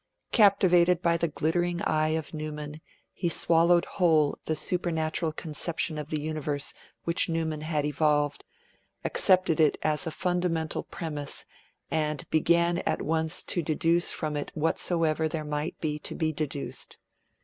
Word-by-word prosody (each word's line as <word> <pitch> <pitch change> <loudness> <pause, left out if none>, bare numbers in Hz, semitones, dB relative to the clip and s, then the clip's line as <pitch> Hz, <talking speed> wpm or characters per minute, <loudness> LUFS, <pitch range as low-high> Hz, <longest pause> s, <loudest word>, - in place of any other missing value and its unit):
Captivated 180 -5 +5
by 170 -1 +3
the 170 0 +1
glittering 170 +3 0
eye 155 0 +1
of 160 -1 -6
Newman, 150 0 -6 0.3
he 175 - -1
swallowed 170 +1 +3
whole 160 -6 +2
the 160 - 0
supernatural 160 -1 0
conception 155 0 -2
of 150 0 -6
the 155 - -1
universe 150 -2 -3 0.3
which 170 +1 +1
Newman 160 -2 -1
had 155 -2 -1
evolved, 150 0 +1 0.6
accepted 185 -4 +3
it 155 -2 +4
as 155 +1 0
a - - -2
fundamental 175 -2 -1
premise, 150 -4 -5 0.5
and 150 -2 -1
'began 170 +2 +3
at - - -1
once 160 +1 0
to 175 - -1
deduce 165 +2 +1
from 155 -2 -3
it 145 - -3
whatsoever 160 0 +1
there 155 0 -4
might 150 +2 -3
be 150 -2 -2
to - - -5
be 155 -1 0
deduced.' 145 -2 -4
160 Hz, 140 wpm, -28 LUFS, 150-170 Hz, 0.6 s, Captivated